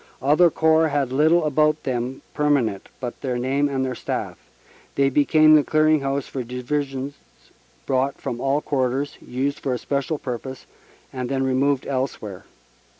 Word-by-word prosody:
Other 150 +6 +4
Corps 160 0 +3
had 140 -4 -1
little 155 +5 +3
about 155 +1 +2
them 125 +1 -3
permanent 140 -9 0
but 125 -2 -6
their 125 -2 -2
name 135 +4 0
and 135 -1 -1
their 130 - -2
staff. - - -4 0.6
They 135 0 +2
became 155 +2 +5
the 150 -1 +6
clearing 155 +1 +3
house 140 0 -2
for 130 - -5
Divisions 135 +2 -3 0.7
brought 135 +1 0
from 120 0 -4
all 140 +2 +1
quarters, 135 -1 -1
used 135 +3 -2
for 130 -3 -1
a - - -2
special 140 +4 -2
pur 125 -4 -4
pose, 130 +1 -9 0.5
and 125 -1 -4
then 135 -1 0
removed 135 +1 +1
elsewhere. 130 -8 -4
135 Hz, 155 wpm, -23 LUFS, 130-150 Hz, 0.7 s, the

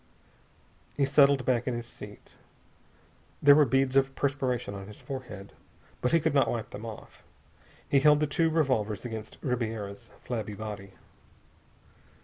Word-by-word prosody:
He 140 - +3
settled 140 -1 +4
back 125 -1 +1
in 125 - 0
his 120 0 -5
seat. - - -13 1.1
There 145 0 +8
were 150 0 +6
beads 135 +1 +1
of 135 0 +3
perspiration 130 -6 -1
on 100 -1 -8
his 105 - -11
forehead, 120 -8 -8 0.5
but 125 - +1
he 165 - +5
could 160 -1 0
not 135 -4 +3
wipe 115 -2 -3
them 115 +3 -7
off. 110 -2 -10 0.7
He 140 - +4
held 150 +1 +5
the 150 - +2
two 160 +3 +1
revolvers 130 - 0
against 110 -2 -6
Ribiera's 110 -6 -3
flabby 110 -4 -4
body. 100 -2 -7
125 Hz, 145 wpm, -28 LUFS, 110-140 Hz, 1.1 s, There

